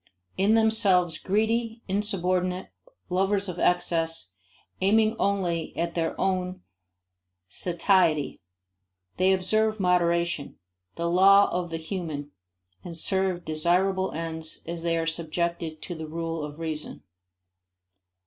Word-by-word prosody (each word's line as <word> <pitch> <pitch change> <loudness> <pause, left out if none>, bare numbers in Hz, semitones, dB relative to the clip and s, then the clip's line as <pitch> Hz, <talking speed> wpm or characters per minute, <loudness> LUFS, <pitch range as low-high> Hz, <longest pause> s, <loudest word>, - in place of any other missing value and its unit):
In 200 +4 +3
themselves 200 -6 +3
greedy, 225 +3 0
insubordinate, 185 -2 -1 0.4
lovers 195 +2 +1
of 180 -1 -5
excess, 165 - 0 0.5
aiming 215 +3 +3
only 180 -5 -1
at 170 0 -1
their 165 -1 -2
own 185 -1 -1 0.8
satiety, 170 - +1 0.8
they 185 +1 +4
observe 215 +3 +1
moderation 170 -4 +1 0.4
the 170 - -2
law 195 +3 +6
of 175 -1 -2
the 165 - -3
mean 155 -6 -4 0.5
and 170 -2 -7
serve 190 0 0
desirable 180 +4 +1
ends 160 0 -5
as 170 0 -5
they 170 0 0
are 165 - 0
subjected 165 0 -3
to 175 - -5
the 160 -2 -6
rule 165 0 -3
of 150 0 -7
reason. 160 -2 -5
180 Hz, 110 wpm, -26 LUFS, 165-195 Hz, 0.8 s, law